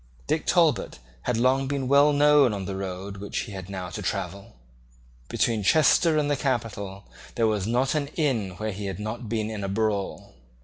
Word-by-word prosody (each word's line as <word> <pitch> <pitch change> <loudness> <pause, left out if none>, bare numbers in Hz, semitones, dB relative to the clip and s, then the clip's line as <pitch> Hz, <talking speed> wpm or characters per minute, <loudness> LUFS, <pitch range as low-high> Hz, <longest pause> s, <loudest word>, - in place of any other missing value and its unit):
Dick - - -1
Talbot - - +2 0.3
had 125 - 0
long 130 +3 +2
been 135 -2 -2
well 140 +2 +5
known 145 -4 +5
on 95 -2 -5
the 95 - -4
road 95 +1 -5
which 100 +1 -3
he 110 - -7
had 95 -1 -7
now 90 -2 -5
to - - -5
travel. 95 -3 -4 0.7
Between 115 -3 +1
Chester 155 - +4
and 150 -1 +1
the 145 - +1
capital 105 -8 -3 0.3
there 115 - +2
was 105 -3 0
not 125 +3 +1
an 150 -2 -1
inn 115 - 0
where 110 +2 -3
he 100 +1 -5
had 95 -3 -4
not 110 +2 -5
been 110 -1 -1
in 105 -2 -5
a 100 - -2
brawl. 100 -1 -2
110 Hz, 190 wpm, -26 LUFS, 100-135 Hz, 0.7 s, well